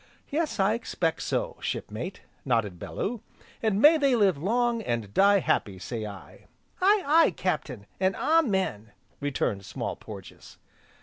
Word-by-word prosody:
"Yes, 310 -4 -1
I 195 +2 +3
expect 180 -8 -2
so, - - -2
Shipmate," 125 - -5 0.2
nodded 110 -8 0
Bellew, 230 +1 -4 0.4
"and 215 -3 +1
may 310 +6 +7
they 275 -3 +3
live 200 -6 +4
long, 230 +9 0
and 115 - -3
die 200 +1 +5
happy, 100 - 0
say 110 +4 -5
I." 100 -2 -12 0.3
"Aye, 400 +1 +4
aye, 320 +3 +5
Captain, 150 - -2
an' 190 0 +2
Amen!" 190 - +1 0.3
returned 130 -8 -1
Small - - -4
Porges. - - -11
190 Hz, 135 wpm, -27 LUFS, -, 0.4 s, may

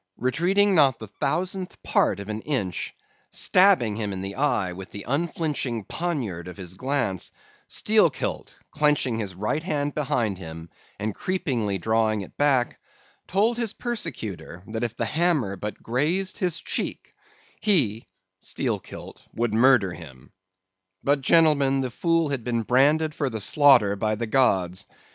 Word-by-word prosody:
Retreating 185 +10 +2
not 140 -8 +4
the 110 - -8
thousandth 180 +5 -2
part - - +2
of 100 - -7
an 110 0 -4
inch; 110 - -3 0.3
stabbing 180 - +4
him 105 -3 -2
in 95 -1 -4
the 95 +1 -5
eye 105 -9 0
with 95 +1 -9
the 100 - -8
unflinching 145 -5 -1
poniard 125 - -3
of 90 - -9
his 90 -2 -7
glance, 125 -4 -1 0.4
Steelkilt, - - +1 0.2
clenching 145 -6 +2
his 100 -4 -4
right 105 +10 -1
hand 145 -4 -2
behind 115 -9 -1
him 80 -1 -9 0.3
and 105 0 -2
creepingly 130 - -1
drawing 110 +1 +1
it 95 - -10
back, 135 -4 +2 0.5
told 215 +5 +2
his 230 -3 -2
persecutor 115 - -5
that 110 0 -4
if 120 -1 -3
the 115 - 0
hammer 150 - +1
but 105 +1 -6
grazed 165 +11 -1
his 180 -3 0
cheek - - -4 0.5
he 130 - +2 0.3
(Steelkilt) - - -5
would 115 -1 0
murder 115 -5 +4
him. 65 -8 -12 0.7
But, 140 0 +2
gentlemen, 140 -3 +4
the 130 -2 -3
fool 165 +3 +1
had 135 -4 -2
been 115 -1 -1
branded 150 +6 +3
for 145 -3 -1
the 110 -2 -4
slaughter 120 -3 +5
by 110 +2 0
the 115 +2 -3
gods. 100 -6 +1
125 Hz, 145 wpm, -25 LUFS, 105-155 Hz, 0.7 s, slaughter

